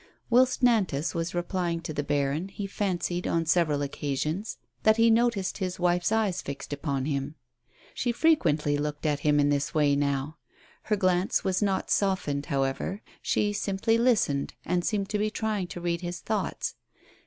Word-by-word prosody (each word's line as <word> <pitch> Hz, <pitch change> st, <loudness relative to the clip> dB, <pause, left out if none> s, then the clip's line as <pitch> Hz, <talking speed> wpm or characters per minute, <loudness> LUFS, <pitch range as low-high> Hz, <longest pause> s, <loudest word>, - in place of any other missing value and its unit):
Whilst 255 Hz, +1 st, +4 dB
Nantas 190 Hz, -, +2 dB
was 170 Hz, 0 st, -3 dB
replying 175 Hz, -1 st, -1 dB
to 160 Hz, -, -5 dB
the 145 Hz, -, -1 dB
baron, 145 Hz, +4 st, 0 dB
he 200 Hz, +1 st, -6 dB
fancied, 180 Hz, -3 st, -2 dB
on 165 Hz, 0 st, +1 dB
several 155 Hz, -3 st, +2 dB
occasions, 150 Hz, +7 st, -3 dB, 0.2 s
that 220 Hz, 0 st, +4 dB
he 230 Hz, 0 st, +5 dB
noticed 225 Hz, -5 st, +1 dB
his 185 Hz, -2 st, -2 dB
wife's 175 Hz, +1 st, +2 dB
eyes 210 Hz, -5 st, +1 dB
fixed 140 Hz, +1 st, -6 dB
upon 140 Hz, -2 st, -2 dB
him. 140 Hz, 0 st, -2 dB, 0.6 s
She 245 Hz, -, 0 dB
frequently 160 Hz, -, +2 dB
looked 150 Hz, +1 st, -3 dB
at 145 Hz, -2 st, +1 dB
him 145 Hz, 0 st, +3 dB
in 145 Hz, 0 st, +3 dB
this 145 Hz, +1 st, 0 dB
way 145 Hz, -2 st, +4 dB
now. 140 Hz, +2 st, -1 dB, 0.5 s
Her 215 Hz, -, +2 dB
glance 185 Hz, -1 st, +1 dB
was 185 Hz, +1 st, 0 dB
not 195 Hz, -2 st, 0 dB
softened, 185 Hz, -8 st, 0 dB
however; 135 Hz, +7 st, -1 dB, 0.2 s
she 205 Hz, 0 st, +1 dB
simply 205 Hz, +3 st, +1 dB
listened, 215 Hz, -, +2 dB
and 175 Hz, -1 st, 0 dB
seemed 200 Hz, -1 st, -1 dB
to 210 Hz, -, -1 dB
be 215 Hz, +1 st, +1 dB
trying 215 Hz, -4 st, -2 dB
to 175 Hz, -, -7 dB
read 170 Hz, 0 st, -1 dB
his 175 Hz, -1 st, -4 dB
thoughts. 215 Hz, -1 st, -2 dB
175 Hz, 165 wpm, -27 LUFS, 145-205 Hz, 0.6 s, he